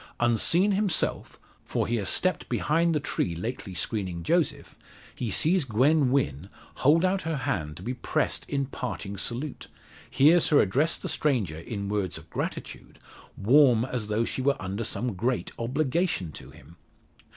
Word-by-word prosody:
Unseen 120 - +3
himself 200 -3 0 0.2
for - - -1
he 120 - 0
has 100 -3 -1
stepped 185 0 0
behind 165 +2 +1
the - - +2
tree 85 -10 -2
lately 100 0 -5
screening 90 -4 -2
Joseph - - 0 0.4
he 120 - -4
sees 165 - +2
Gwen 135 +4 +3
Wynn 95 - 0 0.3
hold 160 +6 +4
out 190 +1 +1
her 160 0 -2
hand 90 - -3
to 90 - -10
be 125 - -2
pressed - - -1
in 140 -1 0
parting 120 -6 -5
salute 120 +8 -5 0.4
hears 155 +5 +5
her 150 - +5
address 140 - +2
the - - -6
stranger 110 - 0
in 100 +3 -5
words 100 -3 -2
of - - -14
gratitude, - - -5 0.4
warm 125 +1 +5
as 125 -5 -4
though 105 +2 0
she 130 - -3
were 140 +1 +1
under 95 +4 -4
some 120 +1 -2
great 120 +6 -1
obligation 130 - -1
to - - -10
him! 85 +6 -16
125 Hz, 160 wpm, -27 LUFS, 100-150 Hz, 0.4 s, hears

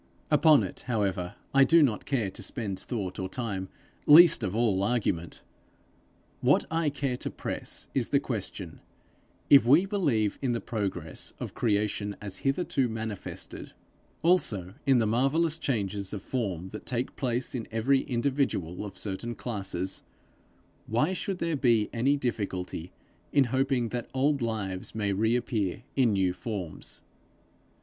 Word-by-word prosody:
Upon 150 -1 +6
it, - - -6
however, 100 -6 -1 0.2
I 135 0 +7
do 165 +4 +6
not 115 -7 0
care 115 -8 0
to - - -11
spend 100 -6 -4
thought 100 -7 -4
or 95 0 -3
time, 95 -5 -4 0.4
least 165 -3 +8
of 95 0 -2
all 110 -5 +2
argument; 100 -7 -1 1.0
what - - +3
I 160 -1 +1
care 140 -3 -2
to - - -4
press - - -5
is - - 0
the - - +4
question - - -5 0.7
If 135 -4 +8
we 150 +9 +6
believe 145 - 0
in 130 -3 +1
the 115 - -1
progress 95 -9 -3
of - - -5
creation 105 -2 0
as 100 -2 -6
hitherto 135 -2 0
manifested, 110 -2 -6 0.5
also 110 - +2
in 135 -2 +6
the 115 - +3
marvellous 140 +9 +2
changes 100 -7 -2
of 100 -3 -5
form 95 -8 -3
that 105 - -9
take 125 +1 -2
place 125 -1 -2
in 120 -4 -4
every 125 +5 +3
individual 125 - -1
of 100 -2 -8
certain 110 +4 -3
classes, 95 -5 -4 0.9
why 125 +11 +1
should 190 0 -3
there 170 -2 -1
be 120 -6 +2
any 135 +5 +2
difficulty 95 - -3 0.4
in 140 - +5
hoping 130 -3 +1
that 120 0 -4
old 140 +1 +2
lives 105 -5 -3
may 100 -2 0
reappear 110 -1 0
in 125 -5 +3
new 95 -2 +2
forms? 90 -3 -5
115 Hz, 145 wpm, -28 LUFS, 100-135 Hz, 1.0 s, least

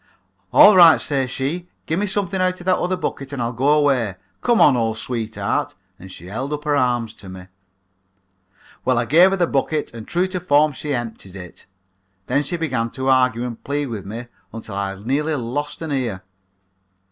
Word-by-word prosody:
"'All 210 - +8
right,' 170 -3 +8
says 135 -3 0
she, 155 +8 -3 0.2
'gimme 185 +6 -1
something 190 -1 -1
out 185 0 0
of 175 - -11
that 185 -1 +2
other 180 +1 -1
bucket 135 -6 -4
and 140 - -5
I'll 120 0 -2
go 130 +5 +1
away. 135 -9 +2 0.3
Come 240 -2 +2
on, 140 - +6
old 115 -2 -1
sweetheart,' 115 -2 -3 0.2
and 95 +1 -11
she 85 - -11
held 110 +10 -5
up 150 0 -4
her 150 -1 +1
arms 120 -4 0
to 100 -4 -13
me. 95 0 -10 1.4
"Well, 130 -2 +1
I 120 - +1
gave 170 +9 +6
her 195 - -1
the 175 - +3
bucket 150 -1 -1
and 115 -2 -9
true 175 +2 +1
to 185 -1 -3
form 150 -3 +3
she 145 +2 -6
emptied 110 -5 -6
it. 90 -3 -11 0.6
Then 130 +6 +1
she 175 +5 -3
began 125 -8 -1
to 130 +2 -3
argue 125 -2 +2
and 120 -2 -7
plead 145 -1 -2
with 105 -4 -6
me 115 +4 -6 0.3
until 110 -2 -8
I 100 0 -3
nearly 140 +10 -1
lost 145 +5 -4
an 160 - -5
ear. 120 -9 -2
135 Hz, 195 wpm, -21 LUFS, 115-155 Hz, 1.4 s, All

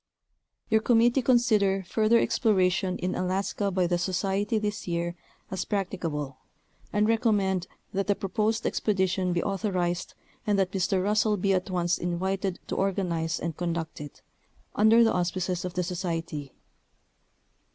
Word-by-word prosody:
Your 220 0 +3
committee 240 +3 +4
consider 220 -6 +3
further 220 +5 +3
exploration 190 -6 +2
in 185 +1 -2
Alaska 195 +2 -1
by 185 -1 +1
the 175 0 0
Society 195 +4 0
this 210 -2 -3
year 170 0 -2 0.4
as 190 -1 -2
practicable, 165 -9 -3 0.5
and 210 0 +2
recommend 205 -5 +1 0.3
that 195 0 -1
the 205 - +3
proposed 215 +4 -1
expedition 190 -3 0
be 175 -1 0
authorized, 185 -3 -1 0.3
and 205 -1 +3
that 190 -1 +1
Mr. 190 -1 0
Russell 210 +1 +2
be 195 +1 +1
at 185 0 -1
once 175 -1 0
invited 190 +2 -2
to - - -4
organize 175 -4 -1
and 165 -2 -3
conduct 170 -3 -3
it, 145 -1 -10 0.5
under 220 +2 +6
the 225 - +3
auspices 180 0 -1
of 180 0 -5
the 180 - 0
Society. 165 -5 -4
190 Hz, 140 wpm, -27 LUFS, 175-210 Hz, 0.5 s, under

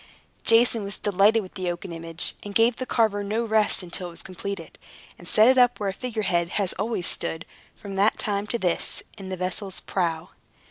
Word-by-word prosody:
Jason 230 -1 +4
was 200 0 -5
delighted 205 +3 +3
with 185 - -12
the 185 -3 -3
oaken 175 +1 -5
image, 165 0 0
and 205 -1 -8
gave 230 +1 +4
the 255 - -4
carver 215 -3 +2
no 220 +4 -1
rest 215 -3 +3
until 180 +1 -5
it - - -7
was 170 - -8
completed, 185 -1 -7 0.4
and 175 - -11
set 225 +7 +6
up 245 -1 +4
where 205 -2 -1
a - - -3
figure 225 0 -4
head 170 -3 +1
has 195 -3 0
always 210 -4 -1
stood, 160 0 -3 0.3
from 200 -1 -9
that 200 +3 +3
time 205 0 -1
to 235 - -1
this, 180 -6 -1 0.2
in 190 -1 -7
the 185 - -4
vessel's 185 +1 -3
prow. 170 -3 -2
200 Hz, 200 wpm, -25 LUFS, 180-220 Hz, 0.4 s, set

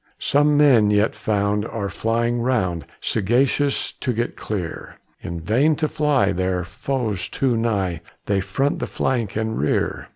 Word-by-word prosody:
Some 145 +1 +2
men 130 -8 +5
yet 105 +1 +2
found 105 -1 0
are 105 -2 -4
flying 115 +3 0
round 95 - 0
Sagacious 130 +7 +1
to 125 - -1
get 120 +2 -2
clear; 95 -6 -5 0.2
In 85 0 -5
vain 125 - +2
to 155 +1 0
fly, 145 -10 +2
their 90 0 -1
foes 100 0 -3
too 130 -3 0
nigh! 100 -8 -1 0.2
They 100 -1 +1
front 135 +8 -1
the - - -3
flank 120 -6 -1
and 110 0 -2
rear. 75 - -1
110 Hz, 150 wpm, -22 LUFS, 100-130 Hz, 0.2 s, men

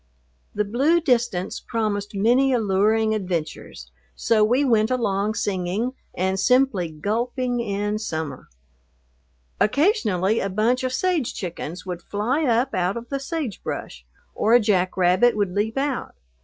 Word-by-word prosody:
The 210 0 0
blue 275 +11 +2
distance 240 - 0
promised 210 -3 -3
many 245 +7 +3
alluring 220 0 +2
adventures, 180 -7 -4 0.2
so 220 -2 +2
we 250 +6 +3
went 220 -3 +3
along 215 -4 0
singing 200 +6 -2 0.2
and 190 +1 0
simply 250 -6 +2
gulping 240 - -2
in 205 -1 -2
summer. 160 - -5 1.1
Occasionally 215 - +2
a 195 - -2
bunch 225 +6 +1
of 255 - -1
sage 330 -1 0
chickens 175 -2 -6
would 180 -2 -5
fly 240 - -1
up 245 +1 +1
out 185 +2 0
of 235 0 -8
the 275 - -2
sagebrush, 275 - -5 0.3
or 225 +3 +3
a - - +7
jack 190 -5 +1
rabbit 185 +6 +3
would 200 -3 0
leap 215 +5 -1
out. 275 -2 -2
215 Hz, 135 wpm, -23 LUFS, 190-250 Hz, 1.1 s, a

